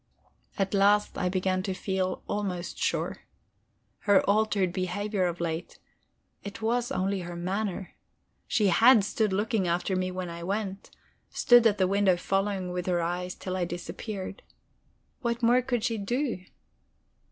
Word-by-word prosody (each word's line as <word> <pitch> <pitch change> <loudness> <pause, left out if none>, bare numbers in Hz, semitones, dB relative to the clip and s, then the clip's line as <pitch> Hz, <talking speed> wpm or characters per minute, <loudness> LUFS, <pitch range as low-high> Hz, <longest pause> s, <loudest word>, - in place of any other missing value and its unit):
At 195 0 0
last 205 +1 +3
I 180 - 0
began 185 0 0
to 190 -1 -3
feel 185 -1 -2
almost 190 -4 -3
sure. - - -1 0.8
Her 205 -2 +3
altered 200 -3 +2
behavior 190 +1 -1
of 175 0 -4
late 165 -1 -3 0.7
it 200 +1 -7
was 240 +3 0
only 195 -4 0
her 175 -1 -6
manner. 190 +2 -3 0.5
She 210 -4 +2
had 230 +4 +6
stood 210 +1 0
looking 205 0 0
after 175 +2 0
me 185 0 0
when 185 0 -4
I 170 0 -7
went; 195 +2 -3 0.4
stood 240 -1 +5
at 210 -2 +1
the 190 - +3
window 195 -2 +3
following 195 0 -1
with 180 0 -3
her 175 -1 +2
eyes 180 +2 -2
till 185 -1 -5
I 185 - 0
disappeared. 185 +3 -6 0.8
What 235 -1 -2
more 245 +2 +5
could 245 -3 -1
she 225 -2 0
do? 235 -2 -2
195 Hz, 150 wpm, -28 LUFS, 180-210 Hz, 0.8 s, had